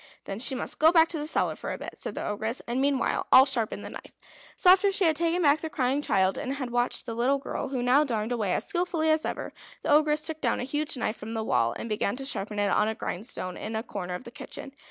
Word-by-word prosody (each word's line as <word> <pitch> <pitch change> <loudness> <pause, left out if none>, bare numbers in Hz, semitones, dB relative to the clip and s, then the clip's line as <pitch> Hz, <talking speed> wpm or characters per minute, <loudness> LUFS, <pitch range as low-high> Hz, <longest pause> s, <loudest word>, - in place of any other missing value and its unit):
"Then 195 +1 -6
she 265 +2 0
must - - -4
go 315 +1 +7
back 330 -1 +5
to 325 - -2
the 295 - -4
cellar - - 0
for - - -5
a - - -4
bit," - - -7
said - - -6
the - - -4
Ogress. 220 +4 -2
"And 245 +3 -1
meanwhile 275 -1 +1
I'll 260 +1 +9
sharpen 245 -6 -2
the - - -6
knife." - - -10 0.4
So 365 - +6
after 390 +2 +5
she 390 -1 +1
had 320 -1 +3
taken 340 +2 +1
back 295 +1 +4
the 320 - -4
crying 265 0 0
child, 190 -8 +2
and 265 +2 -3
had 260 -3 -4
watched 245 +2 0
the 230 - -4
little 250 +4 +2
girl, 275 - -4
who 260 -2 -2
now 260 +4 +5
darned 225 -5 -2
away 215 -6 0
as - - 0
skilfully 345 -4 0
as 315 0 +1
ever, - - -4 0.3
the - - 0
Ogress 300 0 +4
took 315 -1 -4
down - - +1
a - - -2
huge 290 +2 -2
knife 225 -2 -2
from 225 +2 -7
the 220 - -1
wall, 115 - +1
and - - -5
began 210 -1 -1
to 270 +1 -6
sharpen 210 -5 -3
it 205 -1 +1
on 210 - +3
a 220 - -1
grindstone 185 -3 -4
in 220 +1 -5
a 220 - -2
corner 180 -6 -5
of 180 - -7
the 235 - -10
kitchen. 270 +2 -8
260 Hz, 270 wpm, -27 LUFS, 220-305 Hz, 0.4 s, I'll